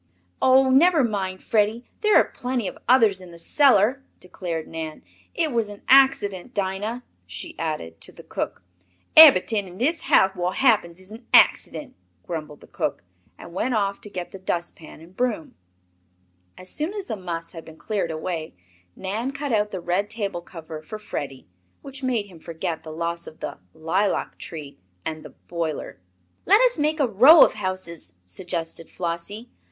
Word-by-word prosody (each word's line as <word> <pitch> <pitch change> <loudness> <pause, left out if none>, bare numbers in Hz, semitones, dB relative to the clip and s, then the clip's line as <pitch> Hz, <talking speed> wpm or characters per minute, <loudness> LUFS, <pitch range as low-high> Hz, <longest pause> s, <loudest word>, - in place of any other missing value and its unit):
"Oh, 260 0 +5
never 315 +2 +5
mind, 195 -5 -2
Freddie, 220 +2 +1
there 425 -1 +3
are - - +7
plenty 245 -4 -3
of - - -7
others 225 -7 +5
in 180 - -11
the 170 - -12
cellar," 260 - +3 0.2
declared 175 -3 -5
Nan. 160 -1 -6 0.3
"It 325 -3 0
was 230 -3 0
an 205 0 -11
accident, 255 -5 +4
Dinah," 205 +5 -2 0.2
she 335 - -5
added, 115 - -4
to - - -5
the - - -13
cook. - - -5 0.5
"Eberyt'ing 225 -9 +8
in 180 0 -12
dis 310 - +1
house 190 0 +4
wot 180 +1 -2
happens 210 -10 +2
is 190 +2 -12
an 230 +2 -12
accident," - - +3 0.3
grumbled 155 -3 -6
the - - -15
cook, - - -3 0.3
and 170 - -12
went 240 +7 -1
off 200 -2 -1
to 210 - -10
get 180 -3 -6
the 195 - -9
dust 175 -2 -2
pan 155 -1 -13
and 170 +3 -16
broom. 240 -9 -2 1.0
As 185 - -9
soon 315 +7 -3
as 405 -3 -4
the 225 - -4
muss 170 -4 -5
had 165 -2 -9
been 160 0 -14
cleared 205 -4 -2
away 160 - -4 0.4
Nan 210 +7 -3
cut 280 -2 -3
out 210 -1 +2
the 190 - -5
red 180 +4 -1
table 200 -6 -3
cover 160 -3 -9
for 215 +7 -8
Freddie, 140 -10 -6 0.4
which 275 -1 -6
made 245 -5 0
him 180 -5 -15
forget 160 0 -4
the 160 - -10
loss 170 +1 -4
of 160 - -12
the - - -6 0.2
"lilac 185 +6 -1
tree" 145 - -8 0.3
and 155 -1 -4
the - - -11 0.2
"boiler." 165 - -4 0.5
"Let 400 +4 +7
us - - +3
make 305 +2 +1
a 275 - +3
row 260 - +8
of - - -2
houses," 185 - -5
suggested 165 - -5
Flossie. 185 +7 -5
195 Hz, 175 wpm, -24 LUFS, 170-245 Hz, 1.0 s, Eberyt'ing